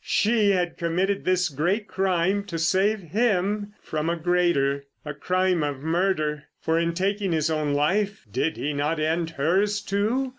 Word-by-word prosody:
She 215 Hz, -1 st, +2 dB
had 180 Hz, -3 st, 0 dB
committed 185 Hz, +4 st, 0 dB
this 185 Hz, 0 st, +2 dB
great 175 Hz, +8 st, -1 dB
crime 190 Hz, +1 st, 0 dB
to 170 Hz, -5 st, -5 dB
save 195 Hz, +6 st, +2 dB
him 205 Hz, +2 st, 0 dB
from 155 Hz, +1 st, -2 dB
a 170 Hz, -, +1 dB
greater. 160 Hz, -5 st, +1 dB, 0.2 s
A 150 Hz, -, -4 dB
crime 185 Hz, +2 st, +1 dB
of 145 Hz, -2 st, -2 dB
murder, 160 Hz, -3 st, 0 dB
for 160 Hz, +1 st, +1 dB
in 170 Hz, 0 st, -1 dB
taking 195 Hz, 0 st, 0 dB
his 160 Hz, 0 st, +1 dB
own 150 Hz, -2 st, 0 dB
life 200 Hz, +8 st, 0 dB
did 140 Hz, +8 st, -1 dB
he 145 Hz, +1 st, -2 dB
not 150 Hz, +3 st, -1 dB
end 160 Hz, +2 st, 0 dB
hers, 195 Hz, +8 st, +2 dB
too? 215 Hz, +7 st, -1 dB
175 Hz, 160 wpm, -25 LUFS, 155-200 Hz, 0.2 s, She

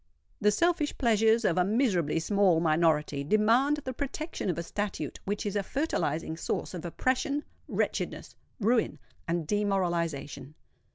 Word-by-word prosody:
The 210 Hz, -, +4 dB
selfish 325 Hz, +6 st, +1 dB
pleasures 225 Hz, -2 st, +3 dB
of 180 Hz, -1 st, +2 dB
a -, -, +5 dB
miserably 190 Hz, -, +1 dB
small 190 Hz, -1 st, +3 dB
minority 155 Hz, -3 st, +2 dB
demand 230 Hz, -, +3 dB
the 260 Hz, -, -3 dB
protection 285 Hz, -, -4 dB
of 175 Hz, -, -1 dB
a 170 Hz, -, -2 dB
statute 185 Hz, -5 st, -4 dB
which 205 Hz, +3 st, -2 dB
is 205 Hz, -1 st, -2 dB
a 205 Hz, -, +2 dB
fertilising 165 Hz, -, -2 dB
source -, -, -3 dB
of 175 Hz, -3 st, -6 dB
oppression, 260 Hz, -, 0 dB, 0.2 s
wretchedness, -, -, -2 dB, 0.2 s
ruin, 225 Hz, +2 st, +2 dB, 0.3 s
and 170 Hz, -1 st, -1 dB
demoralization. 170 Hz, -8 st, -1 dB
200 Hz, 135 wpm, -29 LUFS, 165-235 Hz, 0.3 s, a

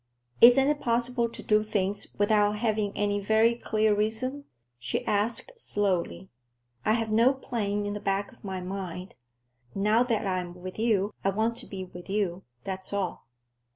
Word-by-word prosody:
"Isn't 255 Hz, +3 st, +8 dB
it 295 Hz, 0 st, +1 dB
possible 235 Hz, 0 st, +1 dB
to -, -, -10 dB
do 210 Hz, 0 st, +3 dB
things 205 Hz, -2 st, -1 dB
without 205 Hz, 0 st, +3 dB
having 210 Hz, -1 st, 0 dB
any 205 Hz, 0 st, +1 dB
very 220 Hz, +3 st, +3 dB
clear 220 Hz, -2 st, +1 dB
reason?" 255 Hz, +7 st, -2 dB, 0.3 s
she 120 Hz, -, -2 dB
asked 210 Hz, +3 st, 0 dB
slowly. 195 Hz, -, -1 dB, 0.5 s
"I 215 Hz, -, +3 dB
have 225 Hz, -1 st, -1 dB
no 235 Hz, +5 st, +4 dB
plan 210 Hz, -6 st, -2 dB
in 205 Hz, -, -2 dB
the 205 Hz, -, -4 dB
back 200 Hz, 0 st, -1 dB
of -, -, -21 dB
my 190 Hz, -2 st, -4 dB
mind. 185 Hz, -1 st, -6 dB, 0.6 s
Now 210 Hz, +4 st, +3 dB
that 230 Hz, -4 st, 0 dB
I'm 180 Hz, -2 st, -2 dB
with 185 Hz, +3 st, -8 dB
you, 215 Hz, -3 st, +1 dB
I 195 Hz, -, +3 dB
want 220 Hz, +4 st, 0 dB
to 245 Hz, -, -7 dB
be 190 Hz, -2 st, -6 dB
with 180 Hz, +1 st, -12 dB
you; 195 Hz, -3 st, -1 dB, 0.2 s
that's 190 Hz, -1 st, -5 dB
all. 195 Hz, -10 st, -3 dB
210 Hz, 165 wpm, -28 LUFS, 195-230 Hz, 0.6 s, Isn't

